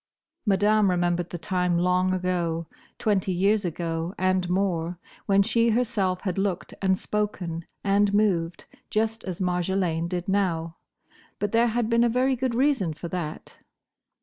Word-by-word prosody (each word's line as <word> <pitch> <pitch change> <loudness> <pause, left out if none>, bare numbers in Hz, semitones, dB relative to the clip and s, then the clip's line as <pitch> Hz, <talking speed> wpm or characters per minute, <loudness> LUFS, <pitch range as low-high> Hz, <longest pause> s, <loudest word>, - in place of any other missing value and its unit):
Madame 205 +1 +4
remembered 175 -1 0
the 175 - -5
time—long 180 +1 +1
ago: 175 -3 -1 0.3
twenty 195 -3 +1
years 200 +4 +2
ago 165 0 -3
and 185 -1 +1
more—when 180 +1 0
she 230 +3 +2
herself 215 -6 0
had 185 -1 -2
looked 195 -3 -2
and 190 -1 +2
spoken 185 -6 -3 0.2
and 200 0 +3
moved, 180 -5 +1 0.2
just 225 +1 -1
as 185 -3 -5
Marjolaine 180 -2 0
did 175 0 -3
now; 170 -5 0 0.6
but 205 -1 -2
there 230 +1 +4
had 235 0 0
been 230 +1 +3
a 240 - +3
very 255 +3 +2
good 250 -1 -1
reason 250 - +1
for 170 - -7
that. 165 -3 -5
185 Hz, 140 wpm, -26 LUFS, 175-210 Hz, 0.6 s, Madame